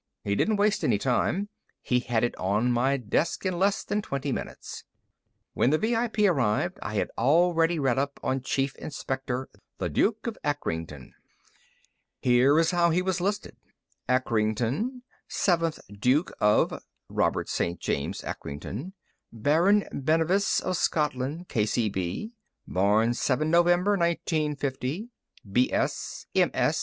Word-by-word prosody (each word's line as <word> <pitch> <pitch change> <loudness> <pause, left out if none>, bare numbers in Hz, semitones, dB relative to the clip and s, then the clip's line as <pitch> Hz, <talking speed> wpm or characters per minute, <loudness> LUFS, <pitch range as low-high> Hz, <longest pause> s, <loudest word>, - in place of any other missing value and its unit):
He 100 - 0
didn't 215 - +2
waste 205 0 +1
any - - +3
time; 135 - 0 0.3
he 125 - +1
had 120 -2 -1
it 120 - 0
on 105 +6 +1
my 130 +3 +2
desk 135 - -1
in 185 -2 -1
less 195 +1 +2
than 210 - -1
twenty 140 -6 -3
minutes. - - -6 0.7
When 120 - +2
the 155 - +3
VIP 225 +2 0
arrived, 175 - +2
I 105 - -5
had - - -1
already 165 +5 +3
read 135 -4 +1
up 140 0 -2
on 130 0 0
Chief 135 +1 -1
Inspector, 135 -2 -4 0.3
The 90 - -2
Duke 215 - +1
of 230 -2 -4
Acrington. 80 - -3 1.1
Here's 135 +6 +4
how 175 -1 +3
he 175 +2 +1
was 185 -2 -1
listed: 200 +3 -2 0.5
_ACRINGTON, 125 - 0 0.2
Seventh 165 -4 +1 0.2
Duke 130 - +2
of 105 0 +2 0.3
(Robert - - 0
St. 85 +1 -2
James 70 - -2
Acrington) 105 - -6 0.4
Baron 165 - +3
Bennevis 165 +7 +2
of 185 -1 -1
Scotland, 150 +2 -1
K. 110 - 0
C. 110 0 +1
B.: 95 - -3 0.4
Born 105 +5 +2
7 145 +5 0
November 175 +3 +4
1950, 155 - -1 0.4
B.S., 125 +5 0
M.S. - - +2
145 Hz, 130 wpm, -27 LUFS, 120-175 Hz, 1.1 s, Here's